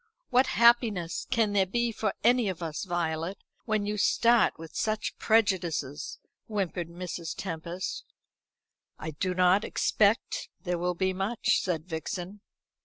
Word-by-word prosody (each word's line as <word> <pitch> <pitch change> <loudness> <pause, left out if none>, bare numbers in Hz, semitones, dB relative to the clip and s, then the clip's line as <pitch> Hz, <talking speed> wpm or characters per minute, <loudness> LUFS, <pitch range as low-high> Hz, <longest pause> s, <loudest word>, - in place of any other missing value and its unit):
"What 255 +1 +4
happiness 230 -7 +3
can 225 -5 +2
there 195 -2 +3
be 235 +4 0
for 215 -2 -2
any 240 -2 +4
of 180 -2 -5
us, 160 +3 -4
Violet, 170 0 -2 0.3
when 215 -2 0
you 210 +1 -2
start 235 +1 +4
with 165 0 -11
such 215 -1 -1
prejudices?" 175 -10 +1 0.3
whimpered 185 -5 -2
Mrs. 170 -1 -5
Tempest. 170 0 -4 0.9
"I 160 - -5
do 180 +4 -2
not 185 +3 +4
expect 210 +1 +1
there 180 -2 -1
will 180 +1 0
be 190 +1 0
much," 195 +5 +1
said 165 -4 -2
Vixen. 180 +4 -5
190 Hz, 135 wpm, -28 LUFS, 170-215 Hz, 0.9 s, What